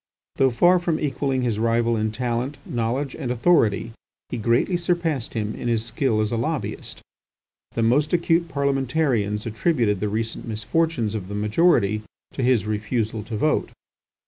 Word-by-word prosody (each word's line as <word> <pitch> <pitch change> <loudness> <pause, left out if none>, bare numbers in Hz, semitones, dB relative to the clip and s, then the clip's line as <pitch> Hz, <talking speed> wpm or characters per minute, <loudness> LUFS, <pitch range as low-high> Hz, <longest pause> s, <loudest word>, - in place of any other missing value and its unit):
Though 135 - +4
far 175 +9 +4
from 170 -2 -1
equalling 135 -3 -1
his 115 -4 0
rival 115 +1 +2
in 110 0 0
talent, 125 +4 -2
knowledge, 125 +4 -2
and 135 -6 -4
authority, 115 - +2 0.4
he - - -3
greatly 120 - +2
surpassed 170 -8 -1
him 110 -1 -2
in - - -5
his 115 -1 0
skill 115 -2 0
as 105 - -1
a 115 - 0
lobbyist. 145 +5 -3 0.7
The 115 - +1
most 145 +7 +3
acute 170 -1 +2
parliamentarians 135 -7 0
attributed 115 - +1
the 105 +1 -1
recent 110 +3 -3
misfortunes 115 +2 0
of 100 -4 -4
the 100 - -5
majority 105 - +2 0.3
to - - -3
his 125 -5 +3
refusal 110 +1 -2
to 110 -2 -4
vote. 155 +8 +1
120 Hz, 155 wpm, -23 LUFS, 110-145 Hz, 0.7 s, Though